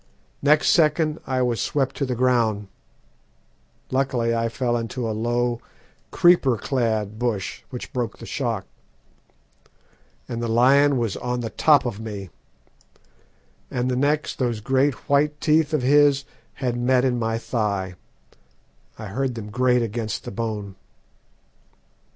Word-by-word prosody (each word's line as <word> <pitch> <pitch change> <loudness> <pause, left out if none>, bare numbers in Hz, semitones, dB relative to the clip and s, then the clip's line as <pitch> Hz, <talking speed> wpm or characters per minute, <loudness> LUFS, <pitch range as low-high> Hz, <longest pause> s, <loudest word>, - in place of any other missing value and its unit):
Next 150 +2 +4
second 155 -1 +2
I 130 -1 +1
was 120 -2 0
swept 135 -3 -1
to 140 - -1
the 125 - -1
ground 115 -5 +1 1.2
(luckily 130 -3 +1
I 115 0 0
fell 120 0 -1
into 115 +1 -3
a 110 - -2
low, 120 +2 -1 0.5
creeper 175 -9 +4
clad 110 -4 -1
bush, 115 -6 -2
which 125 -3 -8
broke 120 -3 -3
the 115 - -10
shock), 115 -7 -2 1.6
and 120 0 -4
the 120 - -1
lion 135 +5 +4
was 115 -5 -1
on 125 0 -2
the 115 -2 -4
top 145 -4 +4
of 115 -4 -3
me, 100 -5 -7 1.4
and 125 0 -1
the - - 0
next 145 +3 0
those 120 -4 0
great 135 +5 +1
white 145 +1 +2
teeth 155 0 +2
of 155 -5 0
his 140 0 +4 0.3
had 125 -3 -2
met 125 +1 +2
in 125 -2 +1
my 115 0 -1
thigh 105 -5 -2 1.0
I 110 - -7
heard 125 +5 -2
them 105 -2 -7
grate 125 +1 +2
against 110 -1 -3
the - - -7
bone. 105 -3 -4
120 Hz, 140 wpm, -23 LUFS, 115-135 Hz, 1.6 s, Next